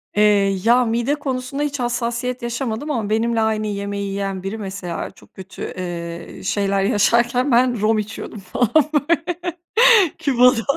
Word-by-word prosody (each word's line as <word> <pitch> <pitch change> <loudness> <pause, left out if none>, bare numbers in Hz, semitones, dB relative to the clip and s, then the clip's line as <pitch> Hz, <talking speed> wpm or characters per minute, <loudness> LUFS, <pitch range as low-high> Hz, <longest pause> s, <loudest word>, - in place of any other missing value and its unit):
Eee, 205 -2 +3
ya, 245 +2 +4
mide 235 +5 0
konusunda 275 -1 -3
hiç 285 -2 -3
hassasiyet 240 +1 -2
yaşamadım 235 +3 -3
ama 225 -7 -2
benimle 225 +1 +1
aynı 215 -1 0
yemeği 200 0 -3
yiyen 195 -1 -3
biri 195 +3 -4
mesela 190 -4 -5
çok - - -21
kötü, 190 0 -11 0.2
ııı, 170 -1 -6
şeyler 195 0 0
yaşarken 240 +5 +2
ben 240 -2 +3
rom 215 0 +2
içiyordum 215 0 -6
falan, 205 +5 -1 0.2
böyle, 330 +3 0 0.8
Küba'da. 250 -5 +3
225 Hz, 140 wpm, -20 LUFS, 200-250 Hz, 0.8 s, ya